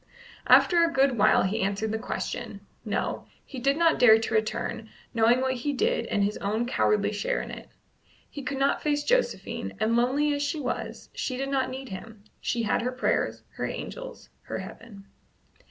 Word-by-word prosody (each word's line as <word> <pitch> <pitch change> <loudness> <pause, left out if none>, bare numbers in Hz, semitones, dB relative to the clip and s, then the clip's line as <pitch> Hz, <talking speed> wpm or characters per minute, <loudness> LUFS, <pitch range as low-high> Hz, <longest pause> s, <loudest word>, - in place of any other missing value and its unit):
After 345 -2 +6
a 335 - +2
good 270 -3 +3
while - - +5
he 205 +4 -1
answered 200 +3 -1
the 220 - -2
question: - - -4 0.2
No; - - -2 0.2
he 265 - -7
did 275 +3 +2
not 330 -1 +3
dare 220 -3 +8
to 225 0 -3
return, 220 0 -1 0.2
knowing 235 +2 +4
what 260 0 +1
he 260 +3 -2
did 470 - 0
and 205 - +1
his 205 +1 0
own 215 +4 -1
cowardly 210 -4 +1
share 205 - -1
in - - -6
it. - - -9 0.6
He 285 - -8
could 275 +1 -4
not 275 +1 +1
face 290 -1 0
Josephine, - - 0
and, 220 +2 +2
lonely 275 +5 +2
as 285 - -2
she 295 +2 -1
was, 255 -4 -4
she 255 - -3
did 270 +1 -2
not 265 -2 0
need 265 0 -7
him; 205 +2 -9 0.2
she 235 -1 -1
had 220 - +1
her 250 +2 -1
prayers, 255 +1 -1
her - - -1
angels, - - -7
her - - -5
heaven. 205 -4 -10
250 Hz, 185 wpm, -27 LUFS, 220-285 Hz, 0.6 s, dare